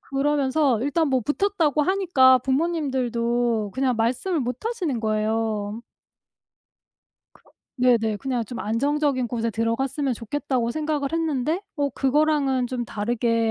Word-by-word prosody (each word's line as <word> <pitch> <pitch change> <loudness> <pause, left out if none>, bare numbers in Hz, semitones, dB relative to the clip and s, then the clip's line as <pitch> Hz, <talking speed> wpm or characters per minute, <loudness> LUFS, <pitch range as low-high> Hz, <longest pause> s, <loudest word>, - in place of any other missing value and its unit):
그러면서 275 -1 +1
일단 295 +3 +1
뭐 260 -2 +2
붙었다고 305 - +1
하니까 310 -8 +4
부모님들도 245 - 0
그냥 260 -2 +1
말씀을 255 +10 0
못 250 - -4
하시는 360 - -2
거예요. 215 0 -1 1.5
그렇 - - -24 0.3
네네 235 -4 +2
그냥 250 0 -2
좀 235 +3 -7
'안정적인 275 +3 0
곳에 230 0 -2
들어갔으면 250 +5 -1
좋겠다.'고 245 +1 -2
생각을 300 +1 -2
했는데 320 +2 -1
어 285 -1 +1
그거랑은 275 -1 +1
좀 245 -1 -3
다르게 230 +1 0
260 Hz, 300 characters per minute, -24 LUFS, 230-295 Hz, 1.5 s, 하니까